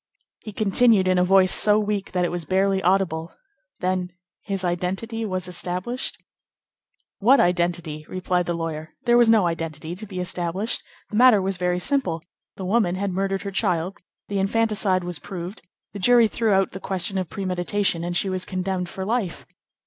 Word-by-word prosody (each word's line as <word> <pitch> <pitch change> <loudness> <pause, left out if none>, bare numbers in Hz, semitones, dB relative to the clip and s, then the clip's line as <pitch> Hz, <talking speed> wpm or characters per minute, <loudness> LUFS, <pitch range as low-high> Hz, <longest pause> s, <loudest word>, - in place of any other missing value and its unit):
He 215 - -8
continued, 210 -1 +3
in 185 -1 +3
a - - +4
voice 185 0 +5
so 210 0 +5
weak 210 -2 -2
that 180 -1 +1
it - - -2
was 175 -1 -3
barely 190 +3 +1
audible:— 175 -3 0 0.5
"Then 185 -1 -1 0.3
his 195 -2 -3
identity 190 +6 -2
was 185 -2 -2
established?" 180 +7 -3 1.0
"What 255 +7 +5
identity?" 175 -3 0
replied 180 -1 -1
the 175 - -1
lawyer. 160 -1 -5
"There 240 -1 +4
was 240 -1 +5
no 220 -4 +5
identity 165 -1 -4
to 210 +4 -9
be 190 -2 -6
established. 180 +4 -1 0.3
The 210 - -2
matter 245 -3 +7
was 190 0 -1
very 180 0 0
simple. 180 - 0 0.3
The 190 - -6
woman 190 -2 +2
had 195 +1 -2
murdered 195 +1 -1
her 200 - -4
child; 180 0 -1 0.3
the 200 -1 -2
infanticide 200 -2 +2
was 175 -3 -4
proved; 185 +1 -7 0.3
the 205 - -6
jury 240 +3 +5
threw 225 0 0
out 195 -1 +2
the 190 - -7
question 190 0 -2
of 185 -4 -4
premeditation, 185 -2 -1
and 175 0 -1
she 195 - 0
was 185 -1 -1
condemned 185 -1 -3
for 190 +1 -5
life." 215 -5 -2
185 Hz, 175 wpm, -23 LUFS, 175-205 Hz, 1.0 s, matter